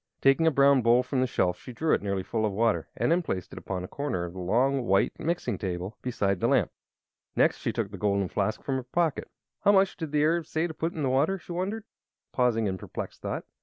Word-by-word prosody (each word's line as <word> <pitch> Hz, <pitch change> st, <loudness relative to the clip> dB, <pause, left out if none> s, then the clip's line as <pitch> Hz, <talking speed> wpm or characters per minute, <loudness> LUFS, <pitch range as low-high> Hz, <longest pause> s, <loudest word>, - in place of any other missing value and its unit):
Taking 135 Hz, +4 st, +4 dB
a -, -, +5 dB
brown 140 Hz, -1 st, +5 dB
bowl 120 Hz, +2 st, +4 dB
from 130 Hz, +1 st, -1 dB
the 130 Hz, -, +2 dB
shelf 90 Hz, -6 st, 0 dB
she 125 Hz, -, -10 dB
drew 160 Hz, +6 st, +1 dB
it -, -, +2 dB
nearly 100 Hz, -2 st, -2 dB
full 110 Hz, +3 st, -2 dB
of 105 Hz, -, +1 dB
water 110 Hz, +2 st, +1 dB
and -, -, +1 dB
then 175 Hz, +2 st, +3 dB
placed 95 Hz, -, -4 dB
it -, -, -7 dB
upon 95 Hz, -2 st, -4 dB
a -, -, -5 dB
corner 130 Hz, -11 st, -3 dB
of 85 Hz, -, -8 dB
the 95 Hz, -, -8 dB
long, 125 Hz, +7 st, +1 dB
white 95 Hz, +1 st, +3 dB
mixing 155 Hz, -, -2 dB
table, 95 Hz, +2 st, -4 dB
beside 100 Hz, -6 st, 0 dB
the -, -, +1 dB
lamp. -, -, +2 dB, 0.6 s
Next -, -, +3 dB
she -, -, -1 dB
took 100 Hz, -, -3 dB
the 100 Hz, -, -8 dB
golden 100 Hz, -1 st, +1 dB
flask 100 Hz, +3 st, -2 dB
from 135 Hz, -1 st, -1 dB
her 130 Hz, -, -4 dB
pocket. 160 Hz, +4 st, -1 dB, 0.3 s
"How 205 Hz, -, +6 dB
much 195 Hz, -1 st, +4 dB
did 160 Hz, -4 st, -5 dB
the 150 Hz, -1 st, +2 dB
Arab 165 Hz, +1 st, +1 dB
say 160 Hz, +1 st, 0 dB
to 170 Hz, -, -4 dB
put 165 Hz, +2 st, -2 dB
in 155 Hz, -, -2 dB
the 135 Hz, -, +1 dB
water?" 150 Hz, +9 st, +2 dB
she 175 Hz, -, -12 dB
wondered, 195 Hz, +5 st, -2 dB, 0.5 s
pausing 120 Hz, -3 st, +2 dB
in 95 Hz, -2 st, -2 dB
perplexed -, -, -7 dB
thought. -, -, -4 dB
125 Hz, 245 wpm, -28 LUFS, 100-160 Hz, 0.6 s, How